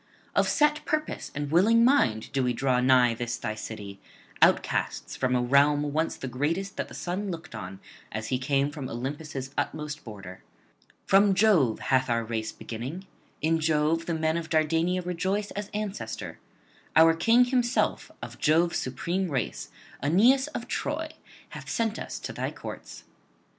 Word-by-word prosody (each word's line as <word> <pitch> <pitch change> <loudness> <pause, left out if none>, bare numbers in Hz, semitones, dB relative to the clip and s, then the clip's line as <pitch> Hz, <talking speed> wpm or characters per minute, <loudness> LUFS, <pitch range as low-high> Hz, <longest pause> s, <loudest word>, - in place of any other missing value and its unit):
Of - - +3
set 300 0 +2
purpose 310 0 -2
and 145 0 -3
willing 225 +8 +5
mind 120 - +2
do 135 -2 0
we 125 -1 +1
draw 130 0 +1
nigh 125 -2 +5
this 120 0 -3
thy 110 - -3
city, 105 -2 -8 0.4
outcasts - - +2
from 130 -1 0
a 125 - +2
realm 145 +3 +3
once 160 +2 0
the 135 - -5
greatest 165 +10 -2
that - - -2
the - - -11
sun 190 +3 -3
looked 170 -1 -7
on 95 +1 -7 0.3
as 110 +1 -4
he 130 - 0
came 140 +2 +1
from 145 -4 -6
Olympus' 135 +2 -5
utmost 150 -1 -4
border. 95 -5 -10 0.6
From 195 0 +5
Jove 180 - +4
hath 130 -1 +3
our 115 -1 +1
race 110 -1 -3
beginning; 130 +12 -7 0.4
in 165 +1 +2
Jove 160 +1 +1
the 170 - 0
men 160 +1 0
of 165 -1 -5
Dardania 165 +3 +1
rejoice 190 +4 -1
as 205 0 -5
ancestor; 210 -1 -5 0.6
our 165 0 +7
King 230 +9 +4
himself 245 -1 0
of - - -8
Jove's 165 +3 +3
supreme 170 +9 -2
race, 130 -5 -3 0.3
Aeneas 240 - +4
of - - -6
Troy, - - -2 0.4
hath - - -9
sent 225 -1 -1
us - - -5
to - - -5
thy - - -2
courts. - - -9
155 Hz, 160 wpm, -27 LUFS, 125-185 Hz, 0.6 s, our